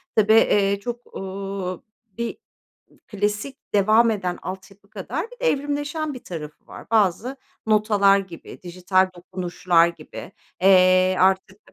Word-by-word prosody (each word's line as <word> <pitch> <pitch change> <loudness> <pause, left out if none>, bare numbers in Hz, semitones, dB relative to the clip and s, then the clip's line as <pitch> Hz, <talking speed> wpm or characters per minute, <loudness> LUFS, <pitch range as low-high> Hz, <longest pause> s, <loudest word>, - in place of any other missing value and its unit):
tabii, 215 0 +4
eee, 200 -3 +3
çok, 240 +3 -8
ooo, 195 -1 -5 0.3
bir 235 0 -4 0.7
klasik 210 +6 -3 0.2
devam 215 +3 +4
eden 185 -4 -3
altyapı 190 +2 -9
kadar 220 - -5
bir - - -15
de - - +5
evrimleşen 290 +2 -3
bir 255 - -10
tarafı 150 -4 -9
var. - - -12
Bazı 225 +5 +1 0.3
notalar 210 -2 +3
gibi, 190 -4 -10
dijital 185 +1 +1
dokunuşlar 175 -1 +1
gibi. 160 -3 -9 0.3
Eee, 185 -1 +5
artık 190 +1 +1
195 Hz, 125 wpm, -23 LUFS, 185-220 Hz, 0.7 s, de